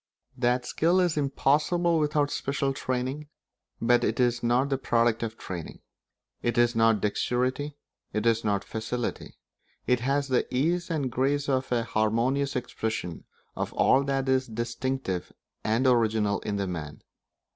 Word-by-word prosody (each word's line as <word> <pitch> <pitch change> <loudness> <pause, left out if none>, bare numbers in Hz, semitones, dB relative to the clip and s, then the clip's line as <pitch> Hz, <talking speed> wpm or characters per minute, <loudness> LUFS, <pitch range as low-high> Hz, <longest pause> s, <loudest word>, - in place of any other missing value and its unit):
That 125 -1 +1
skill 170 +3 +2
is 175 -3 +2
impossible 150 +4 +2
without 150 -1 +1
special 140 0 -1
training, 130 +2 -3 0.5
but 120 +1 +3
it 115 - 0
is 120 -1 +2
not 120 +4 +2
the 135 - +1
product 115 -3 +2
of 115 -1 -4
training; 85 -3 -7 0.6
it 120 0 -1
is 120 0 +3
not 115 -2 +4
dexterity; 130 +7 -1 0.3
it 105 +1 -2
is 115 -1 +3
not 100 -2 0
facility; 115 +2 -4 0.5
it 125 -1 +2
has 140 +3 0
the 130 -2 0
ease 170 +8 0
and 145 -6 -1
grace 140 +3 0
of 130 -2 0
a 120 -2 +2
harmonious 120 +6 0
expression 110 -8 -3 0.3
of - - -3
all 135 - +4
that 135 -1 -1
is 130 0 +2
distinctive 120 -3 -3 0.3
and 115 +5 +1
original 110 -4 +2
in 105 - -3
the 100 -1 -1
man. 75 -5 -6
125 Hz, 145 wpm, -27 LUFS, 115-140 Hz, 0.6 s, not